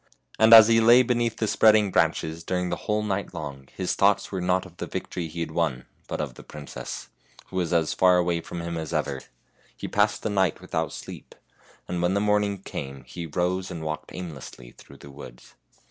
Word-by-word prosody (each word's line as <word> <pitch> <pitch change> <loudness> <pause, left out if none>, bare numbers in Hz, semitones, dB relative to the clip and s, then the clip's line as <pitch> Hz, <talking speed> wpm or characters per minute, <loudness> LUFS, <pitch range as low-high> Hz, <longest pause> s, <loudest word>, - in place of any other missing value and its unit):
And 110 0 +6
as 110 -1 +11
he 115 0 +4
lay 120 +3 +7
beneath 120 -2 0
the 110 - -1
spreading 105 -2 +4
branches 80 -2 0
during 90 0 -2
the - - -1
whole 105 0 +1
night 100 -1 -3
long 70 -3 -7
his 95 -2 -1
thoughts 100 +1 +2
were 95 -2 -3
not 90 +1 +1
of 90 -2 -15
the - - -5
victory 85 -2 -5
he 85 +2 -6
had 80 - -3
won, 80 -6 -1 0.2
but - - -4
of - - -3
the - - -13
princess, 70 -4 -8 0.4
who 95 - -6
was 90 -2 -1
as 80 -3 +1
far 90 -1 +4
away 85 -1 +1
from 85 +1 -7
him 85 0 -4
as 80 0 -5
ever. 70 -3 -2 0.6
He - - -5
passed - - +1
the 110 - -1
night 95 -5 +1
without - - -3
sleep, - - -10 0.5
and 90 -1 -3
when 90 +2 +1
the - - +2
morning 105 -2 +1
came 70 -5 -7
he 65 +7 -7
rose 90 +4 -1
and 85 -3 -6
walked 80 0 -5
aimlessly 70 -8 -9
through 70 - -16
the 70 - -13
woods. 70 -3 -13
90 Hz, 210 wpm, -25 LUFS, 80-100 Hz, 0.6 s, as